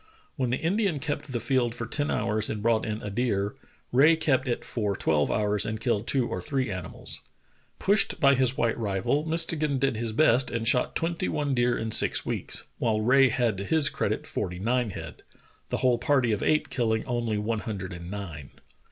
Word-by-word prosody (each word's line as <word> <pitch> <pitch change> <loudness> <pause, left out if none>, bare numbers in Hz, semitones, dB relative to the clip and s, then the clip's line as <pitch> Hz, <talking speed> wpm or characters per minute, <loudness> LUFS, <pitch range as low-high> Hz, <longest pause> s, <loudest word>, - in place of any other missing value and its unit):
When 130 -4 -1
the 125 - 0
Indian 190 0 0
kept 145 0 -4
the 120 - -1
field 120 -2 0
for 120 - -4
ten 145 +5 -2
hours 105 0 0
and 105 -1 -4
brought 115 -1 +2
in 110 0 -4
a 105 - -4
deer, 100 -3 0 0.4
Rae 145 +6 +6
kept 145 -5 +1
it 120 - -2
for 105 -4 -2
twelve 75 -2 +1
hours 105 -2 +1
and 110 0 -1
killed 115 -2 -1
two 130 -3 +1
or - - -4
three 135 -6 -2
animals. 95 -2 -7 0.6
Pushed 200 +1 +2
b}' 140 -1 +5
his 130 -1 +1
white 115 -1 +1
rival, 110 +9 0
Mistegan 160 -3 +1
did 135 -3 0
his 115 0 -2
best 125 0 +3
and 115 -1 -3
shot 125 +1 +2
tvventy 170 +2 -1
one 145 -2 -1
deer 120 -1 +2
in 110 0 -3
six - - +3
weeks, - - -3 0.2
while 110 -2 +1
Rae 130 +4 +5
had 115 -4 0
to - - -3
his 150 +6 +3
credit - - -2
forty 90 0 -4
nine 120 +4 0
head - - -8 0.2
— - - -33
the - - -1
whole 125 -2 +3
party 125 -2 +2
of 105 - -1
eight 155 0 +1
killing 110 -3 0
only 120 -3 -1
one 110 +1 -1
hundred 100 -4 -5
and 85 0 -8
nine. 90 -8 -7
120 Hz, 205 wpm, -27 LUFS, 105-135 Hz, 0.6 s, Rae